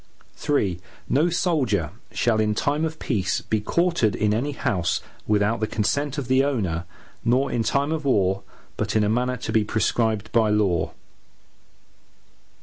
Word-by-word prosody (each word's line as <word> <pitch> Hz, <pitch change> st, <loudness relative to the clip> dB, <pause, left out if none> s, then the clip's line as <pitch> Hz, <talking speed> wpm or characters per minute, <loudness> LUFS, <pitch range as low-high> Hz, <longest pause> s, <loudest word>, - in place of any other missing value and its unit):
III 100 Hz, -12 st, +2 dB, 0.3 s
No 155 Hz, +6 st, +3 dB
soldier 130 Hz, -, 0 dB, 0.2 s
shall, 115 Hz, -2 st, +1 dB
in 105 Hz, -1 st, +1 dB
time 145 Hz, +7 st, 0 dB
of 160 Hz, 0 st, -4 dB
peace 100 Hz, -12 st, -1 dB
be 110 Hz, -1 st, -1 dB
quartered 170 Hz, -, +1 dB
in 105 Hz, -1 st, +1 dB
any 135 Hz, +7 st, -1 dB
house, 90 Hz, -9 st, 0 dB, 0.3 s
without 105 Hz, +2 st, +2 dB
the 110 Hz, -, 0 dB
consent 140 Hz, +8 st, -1 dB
of 140 Hz, -4 st, -3 dB
the 130 Hz, +1 st, +4 dB
owner, 95 Hz, -12 st, -1 dB, 0.4 s
nor 130 Hz, +4 st, +2 dB
in 120 Hz, -, 0 dB
time 140 Hz, +6 st, +1 dB
of 160 Hz, -1 st, -2 dB
war, 100 Hz, -7 st, +2 dB, 0.4 s
but -, -, -2 dB
in 110 Hz, -, +4 dB
a 105 Hz, -, +1 dB
manner 125 Hz, +3 st, 0 dB
to 115 Hz, -, -4 dB
be 110 Hz, -, +3 dB
prescribed 110 Hz, 0 st, 0 dB
by 110 Hz, -2 st, +3 dB
law. 100 Hz, -5 st, +1 dB
115 Hz, 155 wpm, -24 LUFS, 105-140 Hz, 0.4 s, the